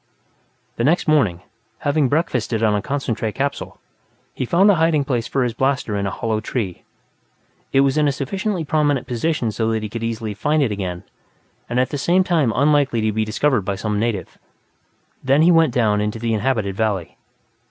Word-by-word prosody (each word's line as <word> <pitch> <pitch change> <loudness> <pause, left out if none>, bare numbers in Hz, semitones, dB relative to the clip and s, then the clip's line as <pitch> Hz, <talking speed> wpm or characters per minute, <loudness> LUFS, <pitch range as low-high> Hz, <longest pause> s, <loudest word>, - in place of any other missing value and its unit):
The 115 - 0
next 165 +7 +2
morning, 105 - +2 0.3
having 145 -2 +1
breakfasted 125 -7 0
on 110 -1 +3
a 105 - 0
concentrate 115 -4 -3
capsule, 140 +1 -3 0.5
he 130 - -3
found 190 - +5
a - - +3
hiding 160 -3 +3
place 125 -4 -2
for 135 - 0
his 120 -2 -1
blaster 130 -4 0
in 100 0 -1
a - - 0
hollow 110 +2 -2
tree. 110 -4 -4 0.9
It 135 - +4
was 140 +2 +2
in 150 - +3
a - - +3
sufficiently 180 +6 -3
prominent 145 -3 +1
position 125 -1 -1
so 110 +1 -1
that 110 -1 -1
he 105 - -4
could 115 +2 -6
easily 115 -2 -3
find 150 +8 +1
it 120 - 0
again, 90 -3 -4 0.7
and 120 +1 0
at 130 0 0
the 145 - -3
same 180 +6 +3
time 160 -10 +1
unlikely 140 -2 +2
to 110 0 +1
be 110 +1 0
discovered 115 +3 +1
by 100 +1 -3
some 105 +1 -2
native. 110 -3 -3 0.8
Then 135 +4 +3
he 175 - +6
went 165 -4 +4
down 110 -4 +1
into 105 +1 -2
the 115 0 -1
inhabited 110 -3 -1
valley. 100 -5 -2
125 Hz, 190 wpm, -20 LUFS, 110-145 Hz, 0.9 s, he